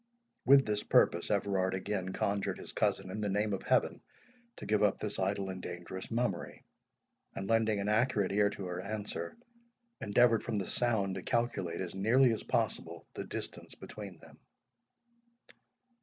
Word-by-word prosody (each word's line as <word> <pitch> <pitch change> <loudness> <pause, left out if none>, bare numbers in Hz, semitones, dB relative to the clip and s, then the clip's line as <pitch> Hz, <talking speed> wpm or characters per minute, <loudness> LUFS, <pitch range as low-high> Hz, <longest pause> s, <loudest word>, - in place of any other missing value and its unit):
With 135 +1 +7
this 105 -1 0
purpose, 85 - +3
Everard 95 -2 +1
again 95 -1 -2
conjured 100 +1 -1
his - - -7
cousin, 95 -1 0
in 105 - -4
the 105 - -1
name 105 +1 0
of 95 - -2
Heaven, - - +1 0.5
to - - -9
give 105 0 +2
up 105 -2 +3
this 105 -1 -4
idle 95 0 -1
and 95 0 -7
dangerous 90 +1 -7
mummery; 115 -6 -2 0.7
and 95 - -4
lending 110 -2 +2
an 100 - -2
accurate 105 -2 +2
ear 100 +1 +3
to 100 -2 -6
her 90 0 -4
answer, 105 - -5 0.6
endeavoured 115 +1 +4
from - - -3
the 95 - -1
sound 110 -5 +1
to 95 - -4
calculate 115 -6 -1
as 90 -2 -4
nearly 115 +6 +4
as 110 - -4
possible - - -2
the - - -5
distance - - -5
between 100 -4 -9
them. - - -17
100 Hz, 160 wpm, -32 LUFS, 95-110 Hz, 0.7 s, With